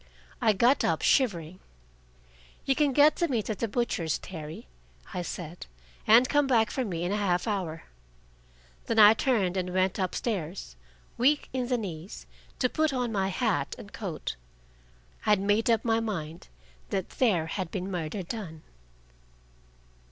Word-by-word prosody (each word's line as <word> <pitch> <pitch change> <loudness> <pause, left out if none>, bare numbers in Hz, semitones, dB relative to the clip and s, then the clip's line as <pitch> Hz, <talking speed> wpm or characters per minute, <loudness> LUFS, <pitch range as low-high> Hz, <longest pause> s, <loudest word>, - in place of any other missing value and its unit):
I 220 - +4
got 240 +7 +3
up - - 0
shivering. 185 - +1 1.1
"You 270 - +3
can 290 0 +2
get 290 +3 +5
the 340 - +1
meat 230 -6 -1
at 210 - -5
the 230 - 0
butcher's, 205 -7 -1
Terry," 155 -4 -8 0.5
I 180 - -2
said, 175 -1 -7 0.4
"and 235 +4 +7
come 290 0 +2
back 225 -5 +3
for 260 - -1
me 175 -7 -3
in 175 - -1
a 205 - 0
half 180 -1 0
hour." 180 -7 -3 1.0
Then 230 - -1
I 210 0 +9
turned 210 -7 +1
and 180 -1 -2
went 185 +1 +1
up 185 -2 -1
stairs, 180 - -4 0.4
weak 285 +4 +3
in 255 -2 -1
the 250 -1 +1
knees, 185 -4 -7 0.3
to 255 - +2
put 310 +4 0
on 250 -3 -1
my 195 -3 0
hat 195 - -1
and 205 - -12
coat. 175 - -5 0.9
I - - +3
had 210 -2 +5
made 205 +4 +1
up 225 -1 +2
my 225 -1 +2
mind 170 -8 -5 0.4
that 190 -2 -2
there 195 -11 +1
had 180 +2 -4
been 190 +1 -4
murder 180 +2 -3
done. 170 -5 -7
205 Hz, 160 wpm, -28 LUFS, 180-235 Hz, 1.1 s, I